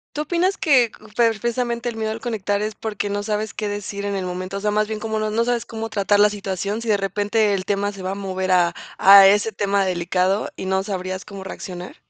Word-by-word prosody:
¿Tú 300 Hz, -, -2 dB
opinas 350 Hz, +5 st, 0 dB
que, 255 Hz, -7 st, +4 dB, 0.2 s
pues, 225 Hz, -3 st, +2 dB
precisamente 235 Hz, 0 st, -1 dB
el 235 Hz, -, -5 dB
miedo 220 Hz, 0 st, -2 dB
al 225 Hz, -, -6 dB
conectar 210 Hz, -3 st, -2 dB
es 215 Hz, 0 st, -3 dB
porque 205 Hz, -2 st, -3 dB
no 205 Hz, 0 st, -2 dB
sabes 215 Hz, 0 st, -2 dB
qué 210 Hz, -, -4 dB
decir 205 Hz, 0 st, -4 dB
en 200 Hz, 0 st, -2 dB
el 190 Hz, -1 st, -2 dB
momento? 185 Hz, +2 st, -4 dB
O -, -, -6 dB
sea, 210 Hz, +1 st, 0 dB
más 210 Hz, 0 st, +1 dB
bien 215 Hz, -1 st, -5 dB
como 220 Hz, -1 st, -2 dB
no 215 Hz, 0 st, -1 dB
no 230 Hz, +2 st, +1 dB
sabes 240 Hz, -1 st, -1 dB
cómo 225 Hz, -1 st, -5 dB
tratar 205 Hz, -1 st, +2 dB
la 210 Hz, 0 st, +6 dB
situación. 200 Hz, +1 st, -3 dB
Sí 235 Hz, -, -7 dB
de 210 Hz, -, +4 dB
repente 205 Hz, +2 st, 0 dB
el 190 Hz, -1 st, -1 dB
tema 205 Hz, 0 st, 0 dB
se 195 Hz, -2 st, -10 dB
va 190 Hz, -, -2 dB
a -, -, -2 dB
mover 190 Hz, -1 st, -2 dB
a 175 Hz, -1 st, +3 dB, 0.2 s
a 195 Hz, 0 st, +9 dB
ese 205 Hz, +3 st, +4 dB
tema 200 Hz, -1 st, 0 dB
delicado 185 Hz, +2 st, 0 dB
y, -, -, -6 dB
¿no 190 Hz, 0 st, 0 dB
sabrías 185 Hz, -1 st, -4 dB
cómo 200 Hz, -2 st, -9 dB
reaccionar? 180 Hz, -1 st, -8 dB
205 Hz, 245 wpm, -22 LUFS, 195-220 Hz, 0.2 s, a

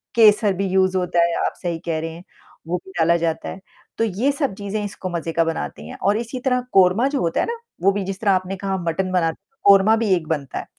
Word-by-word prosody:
केसर 210 Hz, -3 st, +5 dB
भी 195 Hz, +1 st, -2 dB
यूज़ 190 Hz, 0 st, +2 dB
होता 175 Hz, -1 st, +1 dB
है 170 Hz, 0 st, +1 dB
आप -, -, -1 dB
सही 170 Hz, -2 st, -2 dB
कह 165 Hz, -2 st, -1 dB
रहे 165 Hz, +1 st, -4 dB
हैं 170 Hz, +2 st, -11 dB, 0.4 s
वो 180 Hz, -, 0 dB
भी 190 Hz, -, -12 dB
डाला 170 Hz, +1 st, +4 dB
जाता 165 Hz, -1 st, -2 dB
है। -, -, -7 dB, 0.4 s
तो 225 Hz, -, +1 dB
ये 225 Hz, +6 st, +1 dB
सब 280 Hz, -6 st, -1 dB
चीज़ें 205 Hz, +1 st, -4 dB
इसको 200 Hz, -2 st, -5 dB
मज़े 170 Hz, -1 st, -3 dB
का 165 Hz, -, +3 dB
बनाते 75 Hz, -, -4 dB
हैं 75 Hz, -, -9 dB
और 205 Hz, +2 st, +3 dB
इसी 240 Hz, +2 st, -4 dB
तरह 250 Hz, -1 st, +2 dB
कोरमा 190 Hz, +6 st, +5 dB
जो 280 Hz, 0 st, -1 dB
होता 165 Hz, -1 st, 0 dB
है -, -, +1 dB
ना, 470 Hz, -, -3 dB, 0.2 s
वो 195 Hz, +2 st, +4 dB
भी 200 Hz, 0 st, -2 dB
जिस 195 Hz, 0 st, -5 dB
तरह 205 Hz, -3 st, +2 dB
आपने 185 Hz, 0 st, 0 dB
कहा 195 Hz, 0 st, -2 dB
मटन 185 Hz, +3 st, -1 dB
बनाते 165 Hz, -2 st, 0 dB
हैं, 270 Hz, -, -42 dB
कोरमा 200 Hz, +2 st, +6 dB
भी 225 Hz, -1 st, -1 dB
एक 165 Hz, -3 st, -4 dB
बनता 145 Hz, -5 st, -3 dB
है। -, -, -7 dB
190 Hz, 255 wpm, -21 LUFS, 170-210 Hz, 0.4 s, कोरमा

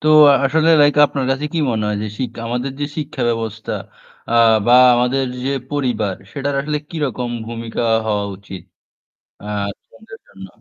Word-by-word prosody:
তো 155 Hz, -, 0 dB, 0.2 s
আ -, -, +5 dB
আসলে 160 Hz, +4 st, +2 dB
লাইক 145 Hz, 0 st, +5 dB
আপনার 140 Hz, -2 st, -3 dB
কাছে 135 Hz, +2 st, -1 dB
কি 170 Hz, -, -1 dB
মনে 110 Hz, -2 st, -1 dB
হয় 105 Hz, -, -1 dB
যে 110 Hz, -, -3 dB
শিক 130 Hz, -, -2 dB, 0.2 s
আমাদের 125 Hz, +3 st, -2 dB
যে -, -, 0 dB
শিক্ষা 150 Hz, -4 st, -4 dB
ব্যবস্থা 115 Hz, -1 st, -3 dB, 0.6 s
আ -, -, -1 dB, 0.3 s
বা 120 Hz, -, +4 dB, 0.2 s
আমাদের 125 Hz, +3 st, +1 dB, 0.2 s
যে 135 Hz, -, 0 dB, 0.2 s
পরিবার 120 Hz, -9 st, -1 dB, 0.2 s
সেটার 140 Hz, 0 st, -3 dB
আসলে 150 Hz, +1 st, -2 dB
কিরকম 130 Hz, -6 st, -3 dB, 0.2 s
ভূমিকা 115 Hz, 0 st, -5 dB, 0.2 s
হওয়া 105 Hz, -1 st, 0 dB
উচিত? 95 Hz, -3 st, -10 dB, 0.8 s
আ -, -, -10 dB, 0.3 s
স্টুডেন্ট 220 Hz, -, -22 dB
দের 225 Hz, -, -10 dB
জন্য। 95 Hz, 0 st, -12 dB
125 Hz, 170 wpm, -18 LUFS, 110-145 Hz, 0.8 s, আ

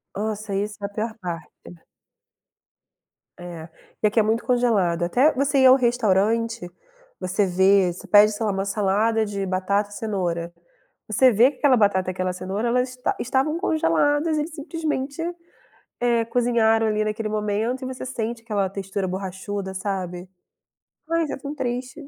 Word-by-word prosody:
Nossa, 215 Hz, 0 st, -3 dB
isso 210 Hz, +2 st, -2 dB
é 200 Hz, -, 0 dB
a -, -, -13 dB
pior 220 Hz, +2 st, -4 dB
parte. 175 Hz, -4 st, -6 dB, 1.9 s
É. 170 Hz, -2 st, -8 dB, 0.3 s
E 215 Hz, -, +4 dB
aqui 220 Hz, +2 st, +1 dB
é 215 Hz, -, +4 dB
muito 225 Hz, +2 st, 0 dB
congelado, 210 Hz, -9 st, +2 dB
até 255 Hz, -, +3 dB
você 275 Hz, +1 st, +1 dB
ir 260 Hz, -, +5 dB
ao 255 Hz, -, +9 dB
restaurante, 230 Hz, -3 st, +1 dB, 0.5 s
você 185 Hz, +3 st, 0 dB
vê, 190 Hz, 0 st, +4 dB
você 175 Hz, -, -10 dB
pede, 210 Hz, +1 st, +6 dB
sei 220 Hz, +1 st, -3 dB
lá, 205 Hz, -, +1 dB
uma 195 Hz, 0 st, -2 dB
salada 210 Hz, +3 st, +1 dB
de 200 Hz, -1 st, -4 dB
batata 195 Hz, +2 st, 0 dB
e 205 Hz, -, -12 dB
cenoura, 175 Hz, -6 st, -3 dB, 0.5 s
você 250 Hz, +4 st, +4 dB
vê 235 Hz, +5 st, +5 dB
que 260 Hz, -, -20 dB
aquela 280 Hz, -3 st, +4 dB
batata 190 Hz, -3 st, +2 dB
e -, -, 0 dB
aquela 185 Hz, 0 st, -2 dB
cenoura 190 Hz, +5 st, -3 dB
elas 250 Hz, +2 st, +1 dB
esta 250 Hz, 0 st, -3 dB
estavam 270 Hz, +6 st, 0 dB
congeladas, 305 Hz, -, +1 dB
eles 300 Hz, +2 st, -3 dB
simplesmente, 300 Hz, -2 st, -3 dB, 0.8 s
eh, 235 Hz, -1 st, +2 dB
cozinharam 230 Hz, -2 st, +2 dB
ali, 215 Hz, 0 st, 0 dB
naquele 215 Hz, +1 st, -2 dB
momento, 215 Hz, +4 st, -1 dB
e -, -, -3 dB
você 260 Hz, 0 st, -6 dB
sente 235 Hz, -2 st, -4 dB
aquela 205 Hz, -4 st, -1 dB
textura 195 Hz, 0 st, -4 dB
borrachuda, 190 Hz, +1 st, -5 dB
sabe. 185 Hz, -2 st, -4 dB, 0.8 s
Pois, 330 Hz, -2 st, 0 dB
é -, -, -4 dB
tão 285 Hz, +2 st, -7 dB
triste. 255 Hz, +3 st, -4 dB
215 Hz, 160 wpm, -23 LUFS, 195-250 Hz, 1.9 s, ao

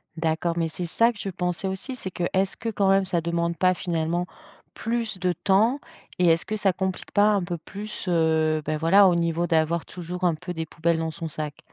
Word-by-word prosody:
D'accord, 165 Hz, +1 st, -1 dB
mais 165 Hz, -1 st, +1 dB
c'est 175 Hz, +3 st, -4 dB
ça 230 Hz, +8 st, +3 dB
que 210 Hz, -, -14 dB
je 195 Hz, -, -3 dB
pensais 180 Hz, +1 st, -2 dB
aussi, 190 Hz, +8 st, -4 dB
c'est 190 Hz, -, -6 dB
que, 175 Hz, -, -4 dB
est-ce 190 Hz, 0 st, 0 dB
que 230 Hz, -, -3 dB
quand 200 Hz, -3 st, +1 dB
même, 195 Hz, 0 st, +4 dB
ça 175 Hz, -2 st, 0 dB
demande 170 Hz, 0 st, -1 dB
pas 185 Hz, +2 st, +4 dB
finalement, 170 Hz, 0 st, -1 dB, 0.5 s
plus 225 Hz, -4 st, -2 dB
de 180 Hz, -1 st, +1 dB
temps? 215 Hz, -, +2 dB, 0.4 s
Et 180 Hz, -, +4 dB
est-ce 165 Hz, 0 st, +3 dB
que, 215 Hz, -, -3 dB
ça 200 Hz, -3 st, +2 dB
complique 190 Hz, 0 st, -3 dB
pas 205 Hz, -, +4 dB
un 205 Hz, -3 st, +3 dB
peu 175 Hz, -1 st, -3 dB
plus, 205 Hz, +5 st, -7 dB
heu, 160 Hz, -2 st, +2 dB
bah 155 Hz, 0 st, -1 dB
voilà, 190 Hz, +5 st, +6 dB
au 175 Hz, -, +2 dB
niveau 170 Hz, 0 st, 0 dB
d'avoir 160 Hz, +1 st, +1 dB
toujours 180 Hz, +1 st, -7 dB
un 175 Hz, -2 st, +4 dB
peu 180 Hz, +3 st, -6 dB
des 160 Hz, -1 st, -3 dB
poubelles 165 Hz, +1 st, 0 dB
dans 160 Hz, 0 st, -2 dB
son 165 Hz, +1 st, -6 dB
sac? 150 Hz, -1 st, -5 dB
175 Hz, 225 wpm, -25 LUFS, 165-195 Hz, 0.5 s, voilà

